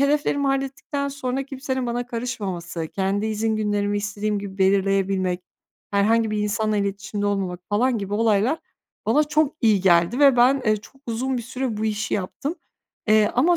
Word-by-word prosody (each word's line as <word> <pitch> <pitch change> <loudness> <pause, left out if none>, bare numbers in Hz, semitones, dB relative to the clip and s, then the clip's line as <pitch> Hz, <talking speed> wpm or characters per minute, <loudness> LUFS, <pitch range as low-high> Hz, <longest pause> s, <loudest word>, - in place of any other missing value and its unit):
hedeflerimi 285 0 +2
hallettikten 275 +1 -2
sonra 270 -1 -3
kimsenin 265 -1 -3
bana 240 +1 -2
karışmaması, 195 -9 -4
kendi 195 +3 -1
izin 220 0 0
günlerimi 205 -1 0
istediğim 210 0 -2
gibi 200 -1 -7
belirleyebilmek, 195 -1 +2 0.5
herhangi 220 +2 +2
bir 215 - -1
insanla 210 +1 0
iletişimde 200 +1 -2
olmamak, 190 -3 -1
falan 235 +4 +2
gibi 200 0 -3
olaylar 225 +6 +2 0.5
bana 295 +7 +4
çok 300 0 +1
iyi 215 -5 +4
geldi 175 +5 +3
ve 275 -3 +6
ben, 255 +2 +4
eee, 215 0 +4
çok 210 +5 -14
uzun 255 +3 -1
bir 240 - -3
süre 250 0 -3
bu 215 - -2
işi 215 0 -1
yaptım. 205 - -3 0.5
Eee, 215 0 +5
ama 335 +8 +4
215 Hz, 160 wpm, -23 LUFS, 200-260 Hz, 0.5 s, ve